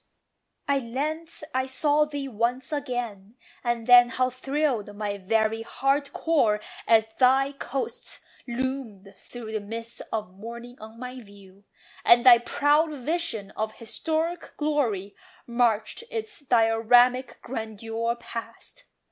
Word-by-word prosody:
At 280 -1 +2
length 305 +8 -4
I 260 0 0
saw 295 +3 +2
thee 290 -2 -5
once 245 +4 -1
again! 245 -8 -4 0.3
and 240 -2 -1
then 245 0 +8
How 255 +1 0
thrilled 255 -5 -1
my 205 -1 -3
very 220 +3 +1
heart 275 +4 0
core 260 -12 +2 0.3
as 220 -1 +4
thy 265 +2 +4
coasts 275 -1 -5 0.2
Loomed 240 -6 -4
through 235 -3 -9
the 220 - -1
mists 230 +3 -7
of 215 -4 -4
morning 235 +4 -9
on 220 +1 -11
my 250 +1 -6
view, 200 -2 -17 0.4
And 240 +1 +6
thy 240 -2 +10
proud 290 +6 +2
vision 285 - -2
of 220 0 -3
historic 320 +8 -2
glory 240 -11 0 0.3
Marched 235 - +1
in 465 0 -7
its 440 0 -5
dioramic 245 +2 +4
grandeur 225 0 -3
past! 235 - -9
240 Hz, 125 wpm, -26 LUFS, 220-275 Hz, 0.4 s, thy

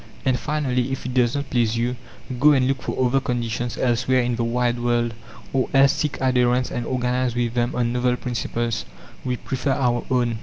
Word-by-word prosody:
"And 130 -2 +2
finally, 135 -4 -1
if 135 - -4
it 125 - -3
does 125 -1 +2
not 140 0 -4
please 115 -3 +1
you, 120 +2 0 0.4
go 150 +3 +6
and 130 -2 +3
look 135 -2 -1
for 130 - -1
other 130 +2 +3
conditions 120 -1 -2
elsewhere 125 +1 +2
in 120 0 0
the 115 - -1
wide 120 +1 0
world, 120 -1 0 0.4
or 130 -1 +1
else 135 0 +6
seek 150 -2 -2
adherents 125 -1 +2
and 120 -1 -3
organize 125 -1 0
with 120 -1 0
them 120 0 0
on 120 -1 0
novel 125 0 +1
principles. 120 -2 -2 0.4
We 125 -1 -1
prefer 135 +2 -2
our 120 -3 +1
own." 120 -3 +1
125 Hz, 195 wpm, -23 LUFS, 120-130 Hz, 0.4 s, go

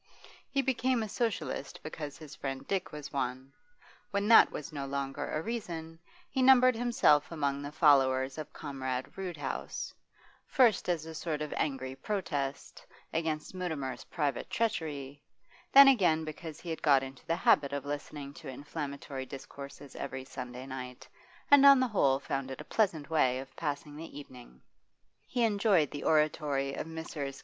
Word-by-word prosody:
He 275 -1 +1
became 255 -2 +1
a - - -3
Socialist 190 - -2
because 150 -2 -6
his 155 -2 -11
friend 135 0 -5
Dick 190 -2 -1
was 150 -1 -8
one; 130 0 -3 0.6
when 200 +1 -1
that 230 - +9
was 150 +2 -7
no 140 -2 -4
longer 140 +1 -3
a 155 - -2
reason, 165 -8 -5 0.3
he 265 - -1
numbered 255 -1 +7
himself 235 - +3
among 140 -3 -1
the 145 0 -6
followers 135 -2 +3
of 155 -1 -6
Comrade 130 -3 -4
Roodhouse 175 -7 -4 0.5
first 235 -9 +3
as 165 -3 0
a 160 - -7
sort 155 -1 -3
of 150 - -5
angry 130 -3 -2
protest, 145 -5 -3 0.3
against 160 -1 -2
Mutimer's 160 -8 -4
private 145 -6 -2
treachery, 150 -11 -2 0.5
then 275 0 +10
again 175 -11 +4
because 155 0 -7
he 170 - -6
had 160 - -4
got 140 -3 +5
into 135 -1 -9
the 165 - +2
habit 140 -4 +3
of 140 -1 -3
listening 145 -1 -5
to 155 0 -11
inflammatory 140 -1 -6
discourses 140 0 -10
every 130 -1 -5
Sunday 125 -1 -7
night, 130 -1 -7 0.4
and 285 -1 +9
on 275 -1 +9
the 255 -1 +2
whole 140 -10 +3
found 135 -1 -3
it 130 - -7
a - - -6
pleasant 165 -9 0
way 130 -5 +3
of 135 0 -8
passing 145 -1 -4
the 160 -1 -9
evening. 125 - -13 0.6
He 245 -2 0
enjoyed 200 - +3
the 145 - -6
oratory 150 -3 +2
of - - -4
Messrs. 155 -4 -5
150 Hz, 160 wpm, -31 LUFS, 135-175 Hz, 0.6 s, then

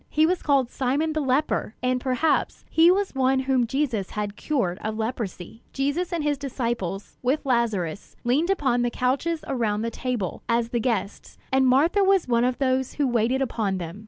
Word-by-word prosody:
He 310 +1 +3
was 360 +2 0
called 275 -4 +2
"Simon 285 +5 0
the 310 - 0
leper"; 265 -4 0
and 250 0 +1
perhaps 260 +5 0
he 325 +1 +6
was 390 +2 +2
one 265 0 +2
whom 260 -2 +1
Jesus 240 -7 -1
had 210 -1 -4
cured 220 -13 -1
of 215 0 -3
leprosy. 220 -3 -4
Jesus 285 +6 -1
and 335 -3 -1
his 290 -2 0
disciples, 235 -8 -4
with 270 +4 0
Lazarus, 220 - -1
leaned 275 +9 +1
upon 265 -10 +1
the 240 - +1
couches 275 +7 -1
around 225 -5 -1
the 230 - -2
table, 240 -7 -3
as 230 0 +1
the 235 - -1
guests; 215 -4 -3
and 265 0 +3
Martha 315 +10 +4
was 385 -4 +3
one 235 -1 +2
of 250 0 +1
those 260 -1 0
who 290 -2 0
waited 245 +2 +1
upon 215 -6 -1
them. 175 +2 -6
255 Hz, 185 wpm, -25 LUFS, 230-285 Hz, -, he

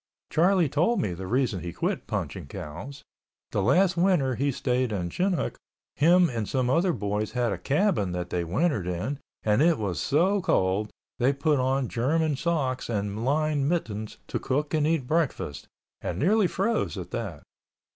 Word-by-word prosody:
Charlie 175 +1 +4
told 165 - +1
me 95 - -1
the 95 +2 -6
reason 120 -3 +1
he 85 0 -5
quit - - -2
punching - - -4
cows. 100 - -8 0.5
The - - 0
last 180 - +3
winter 170 -7 +2
he 140 +3 0
stayed 125 -2 0
in 90 -4 -2
Chinook 185 - -1 0.4
him 175 +4 +5
and 115 -7 -3
some 130 -2 +1
other 175 +5 +3
boys 105 -4 -2
had 120 -3 +1
a - - -3
cabin 145 - +1
that 90 0 -4
they 90 -1 0
wintered 105 - 0
in 90 +11 -3 0.2
and 105 +4 +3
it 165 0 +4
was 100 -5 -2
so 185 +8 +2
cold 100 - +1 0.3
they 125 +2 +4
put 140 +1 +1
on 130 0 +1
German 150 +6 +1
socks 135 -6 -1
and 105 0 -2
lined 145 +1 +1
mittens 110 -11 -3
to - - -2
cook 145 +4 -1
and 155 -1 +2
eat 160 -5 +1
breakfast, 135 - -1 0.3
and - - -3
nearly 200 +6 +3
froze 200 - -1
at 90 -1 -7
that. 95 -10 -5
135 Hz, 170 wpm, -27 LUFS, 105-165 Hz, 0.5 s, him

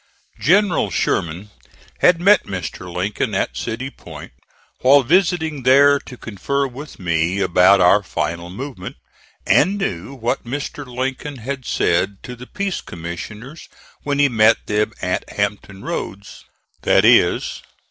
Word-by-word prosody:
General 185 - +2
Sherman 85 +3 -2 0.5
had 180 -2 +4
met 200 +4 +4
Mr. 90 -1 -6
Lincoln 95 +4 -2
at - - -1
City 115 - -4
Point - - -11 0.5
while 135 +2 +5
visiting 160 -1 +1
there 140 +3 +5
to 125 - -12
confer 140 +7 -2
with 135 +3 -9
me 85 +1 0
about 95 +1 +4
our 90 +3 +5
final 85 -1 -4
movement, 105 -1 -7 0.5
and 190 +6 +3
knew 105 - -4
what 120 -2 -2
Mr. 140 +2 -5
Lincoln 130 +3 -4
had 130 +1 -6
said 95 +3 0
to 125 - -8
the 125 +1 -12
peace 200 -2 -3
commissioners 105 - -8 0.3
when 145 -1 -2
he 145 0 +4
met 115 -3 +3
them 105 +1 0
at 90 0 -1
Hampton 100 -1 -3
Roads, 100 +1 -6 0.4
viz. - - +3
120 Hz, 130 wpm, -20 LUFS, 95-140 Hz, 0.5 s, while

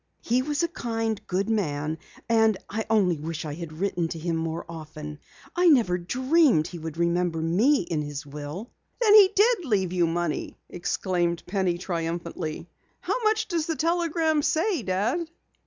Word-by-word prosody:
He 245 +2 +2
was 295 +4 -1
a - - +2
kind, 225 -8 -2
good 190 +2 0
man 160 -8 -1 0.3
and 220 -3 +3
I 220 +1 -3
only 190 -7 +3
wish 160 +1 -4
I 150 - -4
had 165 0 -7
written 175 +1 -1
to 165 - -6
him 165 +1 -2
more 160 0 -3
often. 155 -2 -8 0.4
I 355 0 +4
never 230 - +4
dreamed 260 - +3
he 175 0 -7
would 160 0 -6
remember 170 -1 +1
me 200 - +3
in 165 -3 -2
his 145 -1 -5
will." 150 - -7 0.3
"Then 440 -4 +5
he 410 -3 +9
did 435 -1 +4
leave 190 - 0
you 175 -2 +2
money!" 170 -1 -2
exclaimed 175 -1 -1
Penny 185 -2 0
triumphantly. 170 -2 -4 0.3
"How - - -1
much 435 0 +2
does 335 -4 -1
the 325 - -1
telegram 330 -1 +1
say, 330 - +1
Dad?" 225 - -1
185 Hz, 165 wpm, -26 LUFS, -, 0.4 s, he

